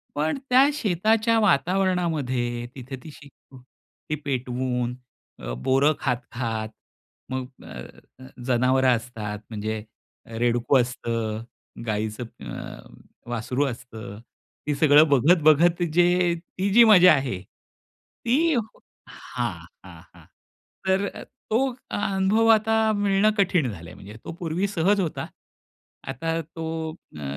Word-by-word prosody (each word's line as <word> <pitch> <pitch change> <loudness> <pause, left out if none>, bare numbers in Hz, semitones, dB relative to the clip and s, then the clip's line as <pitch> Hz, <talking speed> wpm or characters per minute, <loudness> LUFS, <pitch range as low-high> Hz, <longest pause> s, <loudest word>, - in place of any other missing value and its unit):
पण 155 - 0
त्या 260 +2 +7
शेताच्या 220 - +2
वातावरणामध्ये 160 - +1
तिथे 130 0 -7
ती 155 - -10
शेकोटी 135 +1 -12
पेटवून. 125 -2 -2 0.4
अ, - - -5
बोरं 135 +4 +4
खात-खात, 120 -4 -3 0.6
मग 130 -1 -3 0.2
अ, - - -11 0.5
अ, 130 - -12 0.2
जनावरं 130 0 +3
असतात, 110 -3 -6
म्हणजे 110 0 -4 0.4
अ, 115 - -13
रेडकू 120 +2 +2
असतं, 115 -3 -2 0.4
गाईचं 110 +2 -2 0.2
अ, - - -11
वासरू 125 +4 -1
असतं. 110 -4 -7 0.5
ते 150 - 0
सगळं 150 +1 +6
बघत-बघत 160 +4 +4
जे 175 0 +3 0.2
ती 195 +1 +1
जी 235 +2 +8
मजा 185 -5 +8
आहे, 130 -9 -2
ती 290 - -3 0.5
हां, - - -4 0.3
हां, - - -12
हां. - - -17 0.6
तर 190 +1 +2
अ, - - -8 0.3
तो 220 - +3 0.3
अनुभव 200 +2 +1
आता 220 +1 +1 0.2
मिळणं 205 +1 +3
कठीण 175 - +2
झालंय 85 -3 -10
म्हणजे 105 +3 -12
तो - - -6
पूर्वी 175 +4 -1
सहज 195 +2 +2
होता. 165 -4 -3 0.8
आता 165 +5 -2
तो 165 +1 -9 0.5
अ, - - -8
140 Hz, 115 wpm, -24 LUFS, 120-180 Hz, 0.8 s, जी